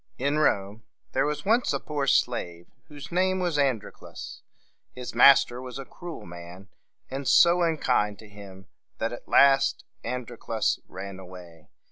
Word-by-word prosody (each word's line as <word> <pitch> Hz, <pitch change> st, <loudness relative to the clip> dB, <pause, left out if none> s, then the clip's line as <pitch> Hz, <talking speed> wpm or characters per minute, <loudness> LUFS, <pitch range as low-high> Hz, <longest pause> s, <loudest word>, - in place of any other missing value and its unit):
In 140 Hz, +3 st, 0 dB
Rome 100 Hz, -7 st, 0 dB, 0.3 s
there -, -, +1 dB
was 150 Hz, 0 st, -4 dB
once 230 Hz, +4 st, +2 dB
a -, -, -1 dB
poor 145 Hz, -3 st, -3 dB
slave 85 Hz, -10 st, 0 dB, 0.2 s
whose 145 Hz, +1 st, -11 dB
name 185 Hz, +1 st, +1 dB
was 175 Hz, -5 st, -1 dB
An´dro 130 Hz, -7 st, 0 dB
clus. -, -, -10 dB, 0.5 s
His 125 Hz, -1 st, -7 dB
master 125 Hz, 0 st, +6 dB
was 130 Hz, 0 st, -8 dB
a 135 Hz, -, -7 dB
cruel 175 Hz, +5 st, -9 dB
man, 85 Hz, +3 st, -11 dB, 0.4 s
and 135 Hz, 0 st, -4 dB
so 175 Hz, +1 st, +5 dB
unkind 125 Hz, -11 st, +1 dB
to 110 Hz, -, -14 dB
him 100 Hz, -2 st, -13 dB, 0.3 s
that 115 Hz, +1 st, -2 dB
at 120 Hz, -, -10 dB
last 135 Hz, -1 st, +4 dB, 0.2 s
An 125 Hz, +2 st, -3 dB
dro 120 Hz, 0 st, -12 dB
clus 110 Hz, 0 st, -1 dB
ran 95 Hz, +1 st, -8 dB
away. 90 Hz, -3 st, -13 dB
125 Hz, 160 wpm, -26 LUFS, 100-145 Hz, 0.5 s, master